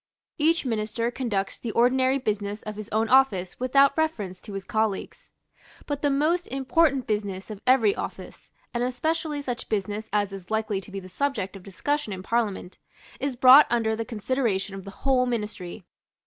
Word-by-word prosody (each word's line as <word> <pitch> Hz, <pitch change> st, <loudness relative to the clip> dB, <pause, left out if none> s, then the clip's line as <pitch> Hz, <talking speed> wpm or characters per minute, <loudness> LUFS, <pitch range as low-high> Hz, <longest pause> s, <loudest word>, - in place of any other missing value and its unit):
Each 320 Hz, 0 st, +2 dB
Minister 230 Hz, 0 st, -1 dB
conducts 210 Hz, -7 st, -2 dB
the 235 Hz, -, -5 dB
ordinary 260 Hz, +2 st, +3 dB
business 210 Hz, -4 st, -3 dB
of 215 Hz, 0 st, -6 dB
his 215 Hz, 0 st, -8 dB
own 220 Hz, +1 st, +1 dB
office 220 Hz, -8 st, +3 dB
without 275 Hz, +2 st, +4 dB
reference 215 Hz, -, -2 dB
to 210 Hz, -, -10 dB
his 195 Hz, -1 st, -5 dB
colleagues. 220 Hz, -, -2 dB, 0.6 s
But 290 Hz, -1 st, -3 dB
the 290 Hz, -, +2 dB
most 310 Hz, +6 st, +1 dB
important 270 Hz, +1 st, +2 dB
business 205 Hz, -2 st, -3 dB
of 210 Hz, -1 st, -8 dB
every 240 Hz, -6 st, +5 dB
office, -, -, -8 dB, 0.2 s
and 240 Hz, 0 st, 0 dB
especially 300 Hz, +3 st, -1 dB
such 245 Hz, -2 st, -4 dB
business 210 Hz, +1 st, -2 dB
as 205 Hz, -1 st, 0 dB
is 190 Hz, -2 st, -9 dB
likely 220 Hz, -2 st, -1 dB
to 195 Hz, -, -13 dB
be 195 Hz, -, -4 dB
the 185 Hz, -, -11 dB
subject 205 Hz, -2 st, -2 dB
of 195 Hz, -, -9 dB
discussion 215 Hz, +6 st, -2 dB
in 185 Hz, -1 st, -7 dB
Parliament, 210 Hz, -5 st, -2 dB, 0.4 s
is 275 Hz, -2 st, -2 dB
brought 260 Hz, +4 st, +8 dB
under 225 Hz, -2 st, +1 dB
the 225 Hz, -, -2 dB
consideration 220 Hz, -3 st, -1 dB
of 195 Hz, -1 st, -8 dB
the -, -, -7 dB, 0.2 s
whole 255 Hz, -2 st, +3 dB
Ministry. 210 Hz, -5 st, -4 dB
225 Hz, 175 wpm, -26 LUFS, 205-265 Hz, 0.6 s, brought